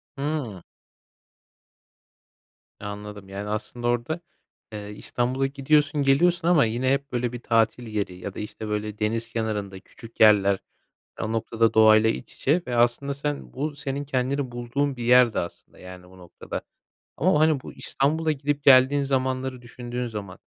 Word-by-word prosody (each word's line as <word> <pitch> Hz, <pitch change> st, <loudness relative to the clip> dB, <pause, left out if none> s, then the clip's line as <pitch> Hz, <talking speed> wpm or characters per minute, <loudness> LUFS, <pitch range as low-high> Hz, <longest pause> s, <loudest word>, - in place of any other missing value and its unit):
Hımm. 135 Hz, -, -3 dB, 2.2 s
Anladım. 105 Hz, -1 st, -8 dB
Yani, 100 Hz, +1 st, -5 dB
aslında 110 Hz, +3 st, -4 dB
orada, 120 Hz, +7 st, -1 dB, 0.5 s
eee, 105 Hz, -1 st, -6 dB
İstanbul'a 125 Hz, +5 st, -1 dB
gidiyorsun, 145 Hz, +1 st, +1 dB
geliyorsun 170 Hz, +5 st, +3 dB
ama 170 Hz, -7 st, +5 dB
yine 120 Hz, +4 st, 0 dB
hep 140 Hz, +1 st, -3 dB
böyle 125 Hz, -1 st, -1 dB
bir 120 Hz, -, -5 dB
tatil 115 Hz, +1 st, +1 dB
yeri 105 Hz, -4 st, -3 dB
ya 95 Hz, +2 st, -7 dB
da, -, -, -8 dB
işte, 105 Hz, +1 st, -6 dB
böyle 105 Hz, 0 st, -3 dB
deniz 115 Hz, +2 st, -1 dB
kenarında 105 Hz, -4 st, -3 dB
küçük 115 Hz, +4 st, -15 dB
yerler 100 Hz, -3 st, +5 dB, 0.6 s
o 110 Hz, -, -2 dB
noktada 115 Hz, 0 st, +1 dB
doğayla 110 Hz, 0 st, +6 dB
iç 65 Hz, -, -6 dB
içe 160 Hz, +6 st, +1 dB
ve 125 Hz, -1 st, -2 dB
aslında 120 Hz, +4 st, +2 dB
sen 145 Hz, +1 st, -4 dB
bu 145 Hz, +2 st, -3 dB
senin 140 Hz, 0 st, -4 dB
kendini 135 Hz, 0 st, -1 dB
bulduğun 130 Hz, +4 st, -2 dB
bir 120 Hz, -, -5 dB
yerdi 125 Hz, -1 st, +5 dB
aslında, 85 Hz, -, -7 dB
yani, 90 Hz, -1 st, -11 dB
o 95 Hz, +1 st, -17 dB
noktada. 90 Hz, -1 st, -7 dB, 0.5 s
Ama, 155 Hz, -1 st, +3 dB
hani, 155 Hz, -3 st, +3 dB
bu -, -, -10 dB
İstanbul'a 155 Hz, +3 st, 0 dB
gidip 145 Hz, 0 st, -2 dB
geldiğin 135 Hz, +1 st, +6 dB
zamanları 130 Hz, -1 st, -1 dB
düşündüğün 120 Hz, +1 st, -5 dB
zaman, 105 Hz, -5 st, -7 dB
120 Hz, 150 wpm, -25 LUFS, 110-140 Hz, 2.2 s, doğayla